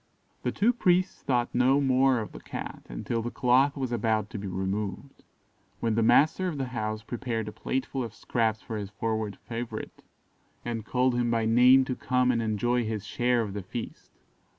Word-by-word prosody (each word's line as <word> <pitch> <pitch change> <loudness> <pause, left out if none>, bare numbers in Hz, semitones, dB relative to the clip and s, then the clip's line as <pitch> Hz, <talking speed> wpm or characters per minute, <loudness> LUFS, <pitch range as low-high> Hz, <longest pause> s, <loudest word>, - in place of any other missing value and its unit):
The - - -1
two 230 +4 +2
priests 185 -4 +2
thought 120 -2 0
no 130 +3 +4
more 130 -2 +3
of 110 - -7
the - - -9
Cat - - -7
until 85 - -3
the 120 - -3
cloth 130 +4 +3
was 130 -3 -2
about 110 -2 0
to 110 - -5
be 100 - -5
removed; 95 +7 -4 0.6
when 115 -1 0
the 115 - +2
master 155 +10 +4
of 165 -5 -3
the 135 -2 -3
house 110 -3 -3
prepared 115 -2 -3
a - - -4
plateful 130 +3 -3
of 115 -1 -7
scraps 110 -2 -1
for 110 - -5
his 100 -2 -5
forward 110 0 -3
favourite, 115 -1 -6 0.6
and 115 -2 -3
called 125 +2 +2
him 120 -1 +1
by 115 -1 +1
name 125 +4 +6
to 130 - -2
come 125 0 +2
and 115 -2 0
enjoy 115 +3 +1
his 110 -2 -3
share 120 -1 +1
of 100 -3 -5
the 100 - -4
feast. 110 +6 -7
120 Hz, 190 wpm, -28 LUFS, 110-130 Hz, 0.6 s, name